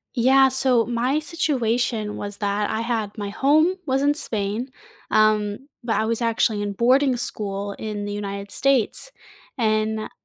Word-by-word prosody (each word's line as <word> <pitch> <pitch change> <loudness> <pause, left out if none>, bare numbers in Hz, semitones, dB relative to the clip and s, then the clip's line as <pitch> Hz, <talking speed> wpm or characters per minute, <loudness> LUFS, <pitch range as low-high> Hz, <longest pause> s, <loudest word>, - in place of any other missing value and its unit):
Yeah, 265 +2 +5
so 255 -3 +3
my 245 +5 0
situation 245 -8 -1
was 205 0 -5
that 205 0 -1
I 220 - -2
had 225 -3 -3
my 205 -1 -4
home 310 - +3
was 265 -1 0
in 290 +1 +3
Spain, 220 0 -2 0.4
um, 215 +3 +2 0.2
but 235 -2 -1
I 220 - +1
was 230 +1 -1
actually 225 -2 +1
in 205 -1 -3
boarding 255 +5 +3
school 200 -3 -2
in 210 -1 -5
the 205 - -4
United 200 -1 -5
States, 275 - +1 0.5
and, 215 -1 0
225 Hz, 150 wpm, -23 LUFS, 205-260 Hz, 0.5 s, Yeah